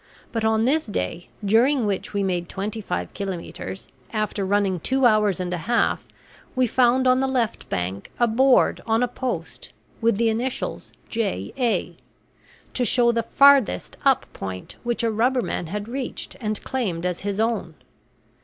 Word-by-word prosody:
But 225 -1 -2
on 220 0 +2
this 305 +3 +2
day 175 - -3 0.2
during 240 +5 +4
which 200 -2 -2
we 200 -1 0
made 175 -3 -1
twenty 210 +3 -4
five - - -4
kilometres 175 - -6 0.2
after 215 -1 -1
running 195 -2 +1
two 265 +9 +1
hours 210 -5 +4
and 180 0 -2
a 180 - -2
half 240 - +1 0.5
we 255 0 +3
found 250 +2 +3
on 255 0 +5
the 270 - +1
left 245 -4 -1
bank 95 +3 -3
a 240 - +4
board 255 +3 +4
on 225 +2 +2
a - - +2
post, 250 +1 -5 0.3
with 230 -3 +3
the 230 0 +3
initials 240 +4 -3 0.2
J. 205 - -2
A., 245 -4 0 0.8
to 250 - +1
show 240 0 +4
the 230 0 +1
farthest 275 +1 +4
up 275 -2 +4
point 95 -1 -7
which 240 -1 -1
a 230 - +2
rubberman 235 -5 0
had 205 +4 -4
reached 255 +2 -5
and 215 -2 -2
claimed 190 -10 -2
as 180 -1 -1
his 200 0 -3
own. 220 -8 -1
220 Hz, 165 wpm, -23 LUFS, 195-245 Hz, 0.8 s, on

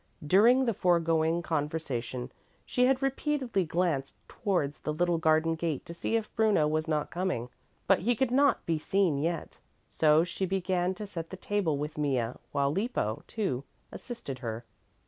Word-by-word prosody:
During 230 - +5
the 230 - +1
foregoing 165 -2 +2
conversation 140 -6 -3 0.3
she 250 0 +2
had 265 0 +2
repeatedly 270 - 0
glanced 160 -5 -1
towards 175 -9 -1
the 150 - -3
little 170 +2 +1
garden 160 0 +3
gate 160 -3 -3
to 170 - -8
see 170 +6 -2
if 225 -2 -2
Bruno 215 -9 +3
was 155 +1 -1
not 155 -2 -1
coming, 175 -9 -2 0.4
but - - +4
he 235 +7 +1
could 250 +2 0
not 280 +2 +3
be 165 -2 0
seen 180 -4 +1
yet. 165 +3 -3 0.3
So 155 0 +4
she 185 +2 -3
began 185 -1 0
to 210 - -6
set 165 -5 -6
the 185 - -7
table 190 -7 0
with 150 +1 -4
Mea, 130 -6 +1 0.2
while 140 0 +1
Lippo, 175 - -1
too, 140 - -2 0.3
assisted 225 - -7
her. 115 -1 -5
170 Hz, 165 wpm, -29 LUFS, 150-200 Hz, 0.4 s, During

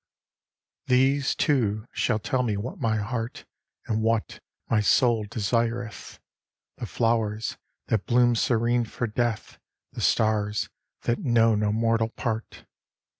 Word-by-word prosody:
XXV - - -57
These, 135 +2 +3
too, 110 -8 +1
shall - - 0
tell 125 +4 -1
me 110 -5 -1
what 115 +6 -5
my 110 -1 +1
heart, 115 +2 -4 0.4
And 110 -1 -1
what 115 0 0 0.3
my 110 - +2
soul 115 0 +3
desireth: 115 +1 -2 0.6
The - - -5
flowers, 115 -2 0 0.3
that 110 -3 -1
bloom 120 0 +4
serene 120 +1 +2
for 120 - -3
death, 115 0 -2 0.3
The - - -7
stars, 105 -1 +1 0.3
that 120 - 0
know 115 -2 +3
no 105 0 +1
mortal 115 0 +1
part. 115 -1 -5
115 Hz, 125 wpm, -26 LUFS, 110-120 Hz, 0.6 s, bloom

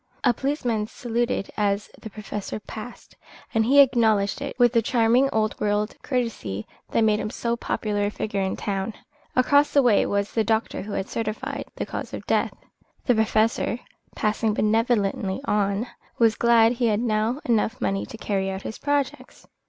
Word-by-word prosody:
A 245 - +4
policeman 245 -6 -1
saluted 235 -3 -2
as 205 0 0
the 220 - -7
Professor 210 0 -6
passed, 220 +3 -10 0.4
and 225 - +3
he 275 +4 +5
acknowledged 225 -5 +4
it 280 - -5
with 245 -1 +4
the 230 - +4
charming 240 +3 +3
old 215 -1 0
world 210 +1 0
courtesy 225 - -2 0.2
that 230 - +2
made 215 -1 +3
him 215 - -3
so 235 0 -2
popular 210 -3 -1
a - - 0
figure 205 -1 -3
in 190 0 -1
the - - -12
town. 200 +1 -2 0.4
Across 285 +3 +4
the 280 - +5
way 230 -5 +4
was 200 0 -1
the 225 - +1
doctor 220 +1 0
who 205 +1 -6
had 190 - -2
certified 260 +6 -4
the - - -3
cause - - -6
of - - -8
death. - - +1 0.5
The 250 - +4
Professor, 220 +1 +1 0.4
passing 215 0 0
benevolently 215 -3 +1
on, 205 0 +1 0.3
was 225 -2 +4
glad 230 -1 +4
he 240 -1 0
had 210 -1 +2
now 225 +2 0
enough 225 0 +1
money 195 0 -1
to 225 - -9
carry 195 -3 -1
out 190 0 -5
his 220 - -6
projects. 285 -1 -2
220 Hz, 175 wpm, -24 LUFS, 210-240 Hz, 0.5 s, he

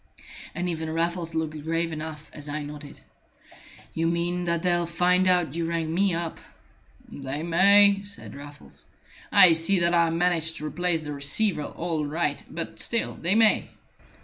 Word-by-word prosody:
And 175 +2 -2
even 160 -2 -3
Raffles 165 +1 -2
looked 155 -1 -3
grave 165 +1 -1
enough 155 -1 -7
as 145 -1 -10
I 150 +1 -4
nodded. 145 0 -10 0.9
"You 165 0 -1
mean 175 +1 -1
that 170 0 -1
they'll 175 -1 +1
find 180 +2 +2
out 180 -6 +2
you 165 0 -2
rang 165 -1 -2
me 195 +2 +2
up?" 165 -1 -4 0.7
"They 140 +2 -5
may," 200 +4 +5
said 200 0 -7
Raffles. 145 +1 -12 0.4
"I 175 -3 +8
see 165 +5 +1
that 170 0 +2
I 170 -1 +3
managed 165 -1 0
to 150 - -7
replace 165 +1 -1
the 150 - -5
receiver 150 +4 0
all 165 -3 -3
right. 150 0 -2
But 165 -1 -6
still 235 - 0
they 175 +5 0
may." 220 -1 +3
165 Hz, 160 wpm, -25 LUFS, 155-180 Hz, 0.9 s, I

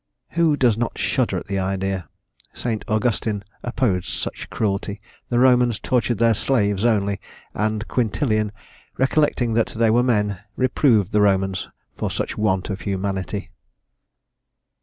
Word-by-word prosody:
Who 165 -3 +3
does 120 -5 +3
not 120 - -2
shudder - - 0
at - - -5
the 100 -1 -2
idea? 95 -1 -2 0.4
St. 115 -3 -3
Augustin 110 -2 0 0.2
opposed 115 -7 0
such - - -4
cruelty. 100 -1 -2 0.3
The 120 - +1
Romans 125 -2 +4
tortured 120 -2 0
their 115 +1 +4
slaves 105 -4 +1
only; 100 -4 +1 0.3
and 110 +1 -1
Quintilian, 110 -3 0 0.5
recollecting 135 -3 +2
that 115 0 +2
they 115 0 +1
were 120 +2 +4
men, 105 -6 +1 0.2
reproved 125 - +3
the 105 0 +3
Romans 95 -2 +1 0.3
for - - -1
such - - -3
want 95 -2 0
of 95 - -5
humanity." 100 0 -3
110 Hz, 135 wpm, -22 LUFS, 100-120 Hz, 0.5 s, Romans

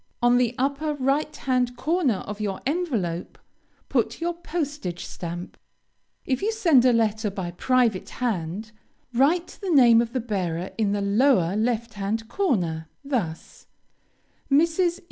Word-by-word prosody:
On 240 0 +4
the 245 -1 +1
upper 280 +3 -1
right 285 +3 0
hand 250 -3 0
corner 295 - +1
of 210 +1 -6
your 195 -2 -2
envelope, 245 - -2 0.5
put - - 0
your 340 +1 -1
postage 290 - -4
stamp. 175 +1 -7 0.7
If 260 -2 -1
you 430 - +1
send 330 - +4
a 255 - +6
letter 220 -2 +1
by 190 -3 -5
private 235 +1 +1
hand, 210 -3 -3 0.4
write 315 +8 +1
the 390 - -3
name 240 -7 +6
of 235 0 -4
the 260 - 0
bearer 185 -6 -3
in 210 -3 +1
the 205 - -1
lower 200 -3 +3
left 230 +1 -1
hand 210 +2 -3
corner, 180 - -1 0.2
thus: 205 - -4 0.8
MRS. 335 +4 +3
240 Hz, 140 wpm, -25 LUFS, 200-285 Hz, 0.8 s, a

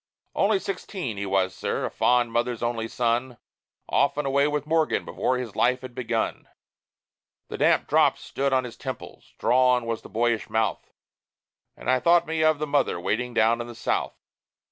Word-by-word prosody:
Only 205 +1 +2
sixteen 185 - -5
he 100 0 -3
was, 95 -1 +1
sir - - -2
a - - -4
fond 120 -1 +2
mother's 120 0 -1
only 115 -1 -1
son 120 +1 -1 0.5
Off 140 - +2
and 150 - -1
away 140 +1 +2
with 150 -1 -2
Morgan 160 0 +1
before 130 - -1
his 125 -5 -6
life 125 +1 +2
has 130 -1 -8
begun! 120 -2 -2 1.0
The - - -6
damp - - +3
drops - - +3
stood 140 0 -2
on 130 -1 +2
his 120 -2 -8
temples - - -8
drawn 125 0 +3
was 115 -1 -3
the - - -13
boyish 115 0 0
mouth; 110 0 -1 0.9
And - - -10
I 130 0 +3
thought 170 +6 +4
me 160 -1 -1
of 155 -1 +4
the 150 - -2
mother 145 -11 +1
waiting 120 +6 -2
down 115 +2 +3
in 120 - -6
the 120 - -9
South. 110 - -2
125 Hz, 180 wpm, -25 LUFS, 115-140 Hz, 1.0 s, thought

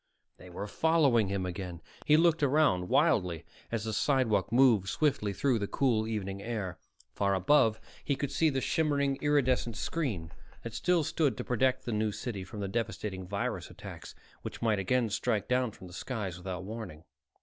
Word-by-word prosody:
They 90 - -13
were 90 +3 -5
following 140 -3 +3
him 95 -1 -2
again! 90 -1 -5 0.3
He 150 - +6
looked 165 -1 +3
around 135 -11 +3
wildly 85 -4 +2 0.3
as 115 -3 -1
the 110 -1 -3
sidewalk 110 - +1
moved 115 -6 +4
swiftly 135 -8 +1
through 120 +4 +1
the 100 - -2
cool 115 -4 +1
evening 100 -3 -3
air. 100 -6 -4 0.3
Far 100 -1 +1
above, 110 +2 +3 0.2
he 140 - 0
could 140 0 -3
see 160 - +3
the 135 -2 -1
shimmering, 140 -3 +1
iridescent 130 -6 +1
screen 105 - -2 0.3
that 115 - -6
still 180 +3 +2
stood 145 -5 0
to - - -3
protect 130 +2 +1
the 120 - -2
New 105 0 0
City 105 -2 -5
from 105 +2 -8
the 100 - -2
devastating 95 -3 -3
virus 100 +1 -3
attacks - - -10 0.3
which - - -7
might 110 -3 +1
again 115 +4 +1
strike 110 0 0
down 125 -1 +1
from 100 - -13
the 90 - -11
skies 105 -4 -4
without 95 0 -5
warning. 105 -7 -7
110 Hz, 175 wpm, -30 LUFS, 95-135 Hz, 0.3 s, He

